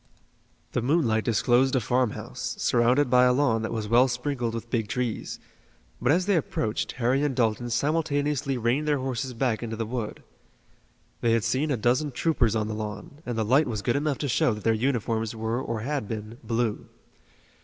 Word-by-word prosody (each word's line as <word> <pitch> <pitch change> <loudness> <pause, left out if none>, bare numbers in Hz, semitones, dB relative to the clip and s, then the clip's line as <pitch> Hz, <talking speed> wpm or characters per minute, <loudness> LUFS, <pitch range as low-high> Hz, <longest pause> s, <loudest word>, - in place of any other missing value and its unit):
The 125 - 0
moonlight 120 -5 +2
disclosed 120 +3 +3
a - - +4
farmhouse, 125 0 -2
surrounded 125 +4 +3
by 125 0 +5
a 125 - +4
lawn 125 -4 +2
that 110 - -3
was 110 -2 -3
well 120 +4 +5
sprinkled 125 -2 -2
with 115 0 -7
big 115 -4 0
trees, 120 0 -3 0.6
but 125 +3 +3
as 180 +4 +2
they 200 -1 +2
approached 115 -8 -1
Harry 130 +2 +1
and 145 -3 0
Dalton 120 0 0
simultaneously 145 +1 0
reined 120 +6 0
their 145 -1 +2
horses 130 -1 -3
back 115 -3 0
into 115 -1 -4
the 115 0 -3
wood. 115 -1 -5 1.0
They 115 -1 +3
had 115 -2 +2
seen 140 +8 0
a 135 - +1
dozen 125 +7 +1
troopers 120 -8 +1
on 105 -1 0
the 110 - -3
lawn, 110 +9 -6
and 120 -2 -2
the 110 - 0
light 135 +8 +4
was 110 -4 -3
good 120 - +1
enough 145 -1 0
to 145 - -2
show 120 -2 +2
that 105 - -9
their 115 - +3
uniforms 115 -2 -1
were 110 +3 -2
or 115 -4 -3
had 140 -2 -2
been 110 +2 -6
blue. 115 -2 -1
120 Hz, 190 wpm, -26 LUFS, 115-135 Hz, 1.0 s, by